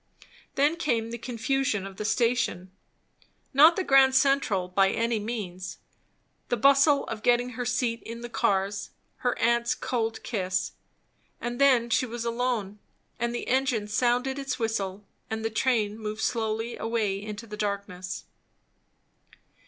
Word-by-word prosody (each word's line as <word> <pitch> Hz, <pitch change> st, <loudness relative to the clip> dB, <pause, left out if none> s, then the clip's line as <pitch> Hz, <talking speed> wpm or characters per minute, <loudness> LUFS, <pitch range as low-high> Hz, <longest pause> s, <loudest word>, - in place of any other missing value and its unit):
Then 290 Hz, +4 st, +2 dB
came 230 Hz, -8 st, -1 dB
the 235 Hz, -, -5 dB
confusion 245 Hz, -2 st, -1 dB
of 195 Hz, -1 st, -9 dB
the 210 Hz, -, -4 dB
Station 230 Hz, -5 st, 0 dB, 0.8 s
not 310 Hz, +5 st, +7 dB
the 380 Hz, -, -1 dB
Grand 270 Hz, -3 st, +5 dB
Central 265 Hz, -9 st, +2 dB
by 195 Hz, +1 st, +3 dB
any 230 Hz, +1 st, 0 dB
means; 200 Hz, -5 st, -5 dB, 0.7 s
the 245 Hz, -, +1 dB
bustle 275 Hz, +4 st, +5 dB
of 225 Hz, -1 st, -6 dB
getting 245 Hz, +1 st, +2 dB
her 250 Hz, 0 st, -4 dB
seat 240 Hz, -1 st, 0 dB
in 230 Hz, +1 st, -8 dB
the 240 Hz, -, -5 dB
cars; 200 Hz, -4 st, 0 dB, 0.3 s
her 245 Hz, -1 st, -1 dB
aunt's 235 Hz, +1 st, +2 dB
cold 225 Hz, -2 st, -2 dB
kiss. 185 Hz, -5 st, -1 dB, 0.7 s
And 240 Hz, +2 st, -4 dB
then 245 Hz, -4 st, +4 dB
she 255 Hz, -, +2 dB
was 235 Hz, 0 st, -5 dB
alone, 230 Hz, -4 st, -1 dB, 0.4 s
and 235 Hz, +1 st, 0 dB
the -, -, -4 dB
engine 255 Hz, -5 st, +1 dB
sounded 250 Hz, +5 st, +1 dB
its 275 Hz, 0 st, -3 dB
whistle, 205 Hz, -4 st, -2 dB, 0.2 s
and 220 Hz, 0 st, -3 dB
the 225 Hz, -, -1 dB
train 220 Hz, -3 st, +1 dB, 0.2 s
slowly 220 Hz, 0 st, -1 dB
moved -, -, -8 dB
away 215 Hz, -4 st, -1 dB
into 210 Hz, +2 st, -7 dB
the 210 Hz, -2 st, -8 dB
darkness. 200 Hz, -3 st, -4 dB
230 Hz, 145 wpm, -27 LUFS, 210-250 Hz, 0.8 s, not